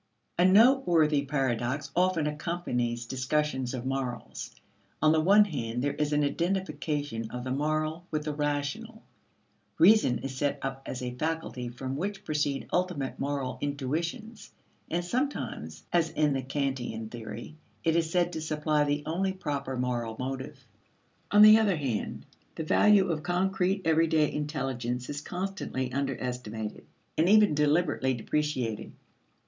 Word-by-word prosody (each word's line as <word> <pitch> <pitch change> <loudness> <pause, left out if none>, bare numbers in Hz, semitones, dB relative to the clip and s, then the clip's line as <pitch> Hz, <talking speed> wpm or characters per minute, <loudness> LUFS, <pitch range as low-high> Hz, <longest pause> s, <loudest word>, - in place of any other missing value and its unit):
A 175 - +6
noteworthy 185 - +5
paradox 135 0 -1
often 180 -3 +2
accompanies 145 -7 -2
discussions 130 0 -1
of 125 0 -5
morals. 130 -2 -4 0.5
On 155 - +5
the 160 0 +3
one 200 +5 +6
hand, 125 - -3
there 145 - 0
is 150 0 -1
an 150 0 +2
identification 150 - -2
of 125 0 -5
the 130 - -4
moral 155 +4 -1
with 155 -1 -2
the 150 0 -3
rational. 145 +11 -3 0.7
Reason 180 - +6
is 135 +3 -6
set 140 +2 0
up 135 0 -3
as 130 - -4
a 125 0 -3
faculty 150 -3 -3
from 130 +2 -5
which 195 +6 -3
proceed 145 -2 -1
ultimate 180 -7 -1
moral 140 -2 -2
intuitions, 165 - -3 0.4
and 175 +1 -1
sometimes, 130 - -3
as 165 -2 +3
in 150 -2 +1
the 135 - -1
Kantian 130 -5 -3
theory, 115 +4 -8 0.3
it 165 0 +2
is 165 -1 +1
said 175 0 +1
to 160 - -3
supply 155 -1 +1
the 145 0 -1
only 190 +4 0
proper 140 -7 -3
moral 120 -3 -2
motive. 130 0 -5 0.6
On 210 +1 +7
the 215 +1 +9
other 205 -4 +2
hand, 130 -8 -3 0.3
the - - -3
value 200 +3 +5
of 155 -2 -2
concrete, 185 +2 0
everyday 160 -1 +3
intelligence 130 -5 -3
is 145 0 -4
constantly 180 -9 -4
underestimated, 125 -5 -4 0.3
and 165 +3 +4
even 210 -4 +6
deliberately 150 -3 +2
depreciated. 125 -3 -2
150 Hz, 140 wpm, -29 LUFS, 130-170 Hz, 0.7 s, the